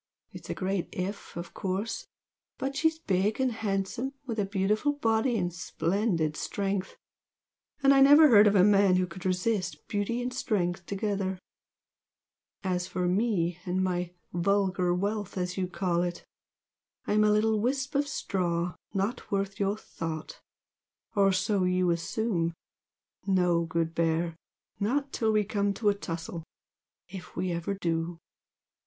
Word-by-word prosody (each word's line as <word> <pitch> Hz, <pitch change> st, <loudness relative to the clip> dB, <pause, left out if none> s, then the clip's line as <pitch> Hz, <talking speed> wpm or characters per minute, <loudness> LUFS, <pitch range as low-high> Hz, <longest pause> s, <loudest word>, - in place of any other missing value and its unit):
It's -, -, -11 dB
a -, -, -2 dB
great 190 Hz, -1 st, -2 dB
'if' 190 Hz, 0 st, -5 dB
of 170 Hz, 0 st, -6 dB
course! 195 Hz, +4 st, -3 dB, 0.5 s
but 275 Hz, +1 st, -3 dB
she's 320 Hz, +2 st, +2 dB
big 205 Hz, -, 0 dB
and 260 Hz, -1 st, +2 dB
handsome, 220 Hz, +4 st, -2 dB
with 230 Hz, -4 st, -3 dB
a 205 Hz, -, +2 dB
beautiful 210 Hz, +8 st, +1 dB
body 230 Hz, -2 st, +1 dB
and 175 Hz, -3 st, -1 dB
splendid 170 Hz, -1 st, 0 dB
strength, 195 Hz, +1 st, -2 dB, 0.9 s
and 275 Hz, 0 st, +7 dB
I 270 Hz, -, +5 dB
never 290 Hz, +3 st, +9 dB
heard 210 Hz, -3 st, +8 dB
of 205 Hz, -, +3 dB
a 185 Hz, -, +6 dB
man 200 Hz, -2 st, +5 dB
who 185 Hz, 0 st, +2 dB
could 185 Hz, 0 st, -6 dB
resist 185 Hz, +2 st, -1 dB
beauty 205 Hz, +3 st, -1 dB
and 250 Hz, +1 st, -3 dB
strength 190 Hz, -8 st, -1 dB
together. 195 Hz, -2 st, -1 dB, 1.3 s
As 180 Hz, -1 st, -1 dB
for 180 Hz, -1 st, -1 dB
ME 180 Hz, -3 st, +1 dB
and 185 Hz, +1 st, 0 dB
my 180 Hz, -1 st, -1 dB, 0.2 s
'vulgar 185 Hz, 0 st, +1 dB
wealth' 200 Hz, +2 st, -2 dB
as 180 Hz, 0 st, -2 dB
you 185 Hz, -1 st, -1 dB
call 180 Hz, -1 st, 0 dB
it, 175 Hz, 0 st, -3 dB, 0.8 s
I'm 215 Hz, +1 st, +3 dB
a 210 Hz, -, +4 dB
little 215 Hz, +1 st, +3 dB
wisp 265 Hz, +5 st, -1 dB
of 285 Hz, 0 st, +1 dB
straw 180 Hz, -, -1 dB, 0.2 s
not 200 Hz, +6 st, -2 dB
worth 195 Hz, 0 st, -1 dB
your 200 Hz, +1 st, +1 dB
thought! 160 Hz, -5 st, -6 dB, 0.7 s
or 195 Hz, -1 st, +5 dB
so 190 Hz, +1 st, +1 dB
you 180 Hz, -1 st, +2 dB
assume 170 Hz, 0 st, -1 dB, 0.7 s
no, 180 Hz, -3 st, +3 dB
good 165 Hz, 0 st, -1 dB
Bear! 165 Hz, 0 st, 0 dB, 0.4 s
not 275 Hz, +7 st, 0 dB
till 220 Hz, -1 st, +1 dB
we 215 Hz, -1 st, +3 dB
come 200 Hz, 0 st, 0 dB
to 210 Hz, -, +2 dB
a -, -, +4 dB
tussle 170 Hz, -3 st, -5 dB, 0.7 s
if 185 Hz, 0 st, -10 dB
we 180 Hz, +1 st, -1 dB
ever 170 Hz, +4 st, -2 dB
do!" 170 Hz, -2 st, -2 dB
195 Hz, 150 wpm, -29 LUFS, 180-215 Hz, 1.3 s, never